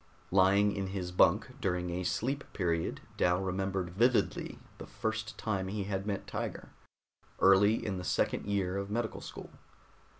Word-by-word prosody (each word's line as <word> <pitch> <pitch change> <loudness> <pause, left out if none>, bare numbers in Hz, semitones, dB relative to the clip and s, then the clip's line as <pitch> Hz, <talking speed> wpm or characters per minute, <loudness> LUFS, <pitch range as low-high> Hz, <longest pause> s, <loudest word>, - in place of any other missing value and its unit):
Lying 100 +2 +4
in 95 -1 -2
his 95 -2 -4
bunk 110 +9 +3
during 90 -4 -1
a 90 +1 -2
sleep 135 +9 -1
period, 85 -3 -1 0.2
Dal 90 0 +3
remembered 95 -1 -2
vividly 120 +6 +1 0.2
the - - -8
first 110 0 -3
time 100 -4 -2
he 100 +1 -2
had 95 0 -3
met 100 -2 -2
Tiger, - - -5 0.7
early 100 +4 +5
in 100 -3 -2
the - - -5
second 90 - 0
year 100 -2 0
of 100 0 -3
medical 110 +1 -2
school. - - -9
95 Hz, 155 wpm, -32 LUFS, 90-105 Hz, 0.7 s, early